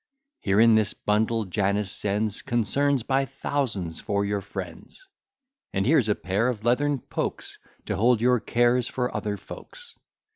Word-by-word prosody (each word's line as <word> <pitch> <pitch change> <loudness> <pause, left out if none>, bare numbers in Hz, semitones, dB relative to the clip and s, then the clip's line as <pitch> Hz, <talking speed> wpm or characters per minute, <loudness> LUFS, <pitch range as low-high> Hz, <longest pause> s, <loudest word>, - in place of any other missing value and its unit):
Here 100 0 +1
in 115 0 +6
this 110 -1 +2
bundle 110 +1 0
Janus 100 +1 0
sends 105 +2 0
Concerns 130 +3 +1
by 135 +2 +1
thousands 110 - -2
for 100 -1 -1
your 100 0 -1
friends. 300 - -9 0.7
And 95 0 0
here's 135 -5 +3
a 105 - +3
pair 100 +6 -1
of 115 -4 -3
leathern 140 +5 +2
pokes, - - -5 0.3
To - - -2
hold 120 +2 +3
your 125 +1 +3
cares 120 +2 +2
for 125 -1 -3
other 105 -2 -2
folks. 485 - -12
110 Hz, 150 wpm, -25 LUFS, 100-125 Hz, 0.7 s, in